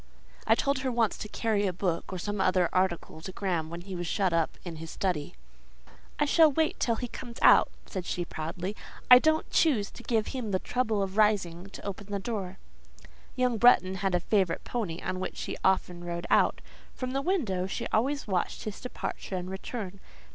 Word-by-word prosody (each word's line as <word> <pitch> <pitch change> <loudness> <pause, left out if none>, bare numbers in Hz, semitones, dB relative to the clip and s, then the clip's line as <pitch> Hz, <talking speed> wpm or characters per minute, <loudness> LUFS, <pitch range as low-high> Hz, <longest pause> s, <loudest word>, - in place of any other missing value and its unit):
I - - +6
told 280 -1 +1
her 260 -1 -1
once 230 -3 +1
to - - -5
carry 210 -3 0
a - - +1
book 180 -1 -2
or 185 - -3
some 205 +2 -2
other 185 -2 +3
article 185 -3 0
to 190 - -6
Graham 175 -5 -2
when 170 +1 -6
he 190 +1 -7
was 175 -1 -4
shut 190 -1 +1
up 165 -1 0
in 170 -2 -6
his 165 +1 -8
study. 175 -3 -2 0.8
"I 295 - +2
shall 315 +1 +6
wait 315 +2 0
till 230 - +2
he 245 +2 -4
comes 235 0 -8
out," - - +7 0.2
said 185 -3 -5
she, 175 - -2
proudly; 175 +5 -4 0.4
"I 250 - +12
don't 315 +3 +2
choose 235 -11 +3
to - - -11
give 225 -3 0
him 250 -5 -4
the 190 - +2
trouble 220 -1 0
of 195 +1 -5
rising 195 -4 +2
to - - -10
open 200 0 -5
the 205 -1 -2
door." 195 -3 -4 0.8
Young 250 -3 +1
Bretton 220 -6 +6
had 195 -2 +1
a - - +3
favourite 185 -2 +1
pony 195 -9 -3
on 185 - -2
which 185 - -4
he - - -4
often 180 -2 +1
rode 170 0 -4
out; - - +4 0.3
from 255 -1 -4
the 270 +1 0
window 235 - 0
she - - -4
always 275 +6 +1
watched 185 -4 -1
his 215 -2 -6
departure 250 -5 -5
and 180 0 -4
return. 195 0 -6
195 Hz, 200 wpm, -29 LUFS, 180-235 Hz, 0.8 s, I